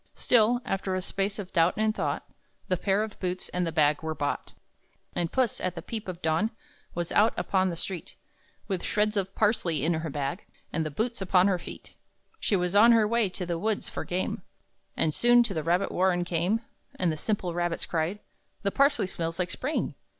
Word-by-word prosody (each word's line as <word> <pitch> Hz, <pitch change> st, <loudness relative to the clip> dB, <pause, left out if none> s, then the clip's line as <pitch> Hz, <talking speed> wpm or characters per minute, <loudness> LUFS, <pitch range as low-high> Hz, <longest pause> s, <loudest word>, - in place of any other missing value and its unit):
Still, 240 Hz, 0 st, +3 dB
after 190 Hz, -1 st, -1 dB
a -, -, 0 dB
space 195 Hz, +1 st, -1 dB
of 195 Hz, -3 st, -7 dB
doubt 170 Hz, 0 st, +4 dB
and 215 Hz, 0 st, +2 dB
thought, -, -, -2 dB, 0.4 s
The 185 Hz, -, +3 dB
pair 195 Hz, +3 st, +1 dB
of 220 Hz, -2 st, -7 dB
boots 185 Hz, 0 st, -2 dB
and 180 Hz, -1 st, -1 dB
the -, -, -1 dB
bag 150 Hz, -2 st, +3 dB
were 160 Hz, 0 st, -3 dB
bought. 145 Hz, 0 st, -3 dB, 0.6 s
And 170 Hz, -2 st, -1 dB
Puss, 255 Hz, -5 st, +1 dB
at 185 Hz, -1 st, -2 dB
the 170 Hz, -, -6 dB
peep 220 Hz, +1 st, -5 dB
of 180 Hz, -1 st, -6 dB
dawn, 160 Hz, +7 st, +2 dB, 0.5 s
Was 175 Hz, -1 st, -2 dB
out 215 Hz, +2 st, +4 dB
upon 190 Hz, -1 st, +1 dB
the 170 Hz, -, -3 dB
street, 180 Hz, +1 st, -5 dB, 0.5 s
With 190 Hz, -4 st, -2 dB
shreds 210 Hz, +1 st, +1 dB
of 195 Hz, -1 st, -1 dB
parsley 180 Hz, -, +1 dB
in 170 Hz, -, +2 dB
her 160 Hz, 0 st, -2 dB
bag, 140 Hz, +5 st, -3 dB, 0.3 s
And 165 Hz, -, +1 dB
the 155 Hz, -, -2 dB
boots 225 Hz, +9 st, -2 dB
upon 185 Hz, -1 st, +4 dB
her 185 Hz, -3 st, +1 dB
feet. -, -, -10 dB, 0.5 s
She 205 Hz, -, +2 dB
was 180 Hz, 0 st, 0 dB
on 230 Hz, +3 st, +8 dB
her 220 Hz, -2 st, +4 dB
way 230 Hz, -2 st, +2 dB
to 180 Hz, 0 st, -4 dB
the 170 Hz, -1 st, -2 dB
woods, 215 Hz, +2 st, -1 dB
for -, -, -4 dB
game, 180 Hz, +1 st, -2 dB, 0.6 s
And 155 Hz, -, +2 dB
soon 240 Hz, +4 st, +5 dB
to 220 Hz, -, -2 dB
the 160 Hz, -, -1 dB
rabbit 175 Hz, +5 st, +1 dB
warren 180 Hz, -1 st, +2 dB
came. 175 Hz, +6 st, 0 dB, 0.3 s
And 180 Hz, -3 st, +1 dB
the -, -, -2 dB
simple 180 Hz, +1 st, -2 dB
rabbits 175 Hz, -1 st, -1 dB
cried, 165 Hz, +4 st, -1 dB, 0.5 s
"The 200 Hz, -, +1 dB
parsley 280 Hz, -3 st, +3 dB
smells 165 Hz, -2 st, -4 dB
like 180 Hz, -1 st, -1 dB
spring!" 290 Hz, +5 st, -2 dB
185 Hz, 205 wpm, -28 LUFS, 170-210 Hz, 0.6 s, on